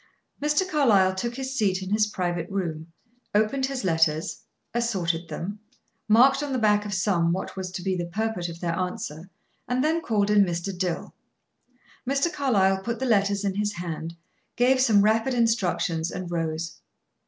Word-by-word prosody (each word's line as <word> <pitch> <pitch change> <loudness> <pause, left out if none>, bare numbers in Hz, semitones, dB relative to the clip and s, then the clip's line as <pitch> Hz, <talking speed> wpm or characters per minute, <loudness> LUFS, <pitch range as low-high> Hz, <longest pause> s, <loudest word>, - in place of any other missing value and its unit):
Mr. 300 +6 +1
Carlyle 220 - +4
took 235 +5 -3
his 265 0 -4
seat 195 -6 +1
in 190 - -6
his 210 0 +3
private 175 -4 -2
room, 165 -4 -4 0.4
opened 240 +6 +2
his 270 -3 -4
letters, 160 +1 +1 0.3
assorted 180 -8 -1
them, 180 +6 -5 0.5
marked 255 +6 +5
on 290 -1 -3
the - - +1
back 210 -2 +2
of 205 - -4
some 175 -3 +2
what 185 +2 -3
was 190 -1 -4
to 180 0 -6
be 190 0 0
the 175 -1 -3
purport 205 -1 -2
of 165 0 -9
their 170 -2 -1
answer, 180 -2 -4 0.4
and 250 +1 0
then 320 +2 +1
called 210 -7 +1
in 205 -1 +6
Mr. 175 +1 -3
Dill. 180 -2 -3 1.0
Mr. 280 +5 +1
Carlyle 195 - +2
put 235 +3 -3
the 265 - -2
letters 200 -3 +2
in 195 - 0
his 205 +1 -1
hand, 165 -2 -5 0.4
gave 255 +2 +3
some 215 -6 +5
rapid 225 +4 +2
instructions, 185 -8 +1
and 180 -1 -6
rose. 165 -1 -3
200 Hz, 170 wpm, -25 LUFS, 175-235 Hz, 1.0 s, in